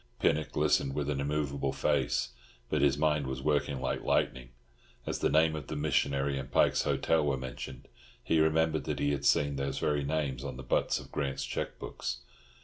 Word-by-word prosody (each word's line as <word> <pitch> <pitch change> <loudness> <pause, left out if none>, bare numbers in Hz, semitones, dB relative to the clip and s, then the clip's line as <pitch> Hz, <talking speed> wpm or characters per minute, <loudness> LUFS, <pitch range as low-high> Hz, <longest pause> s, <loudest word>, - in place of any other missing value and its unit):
Pinnock 75 -2 +1
listened 70 -1 +2
with 75 -1 -1
an 70 -1 -1
immovable 70 -2 -1
face, 70 -1 +1 0.4
but - - +2
his 70 -1 +3
mind 75 -2 +1
was 65 0 -4
working 70 -2 +1
like 65 - -2
lightning. 65 -2 0 0.6
As - - -2
the - - +2
name 80 0 +4
of 75 - -6
the - - -4
missionary 70 -2 +1
and 65 +1 -7
Pike's - - +4
Hotel 80 -1 +2
were 70 -2 +1
mentioned, 65 0 -7 0.4
he 80 - +2
remembered 80 -1 +2
that - - -2
he 70 - +1
had 70 0 -2
seen 70 -1 +3
these 70 0 -2
very 75 0 0
names 70 -3 -1
on 70 -3 -5
the 65 - -7
butts 60 - +1
of - - -12
Grant's 70 -1 -2
cheque - - -4
books. - - -5
70 Hz, 190 wpm, -31 LUFS, 65-75 Hz, 0.6 s, name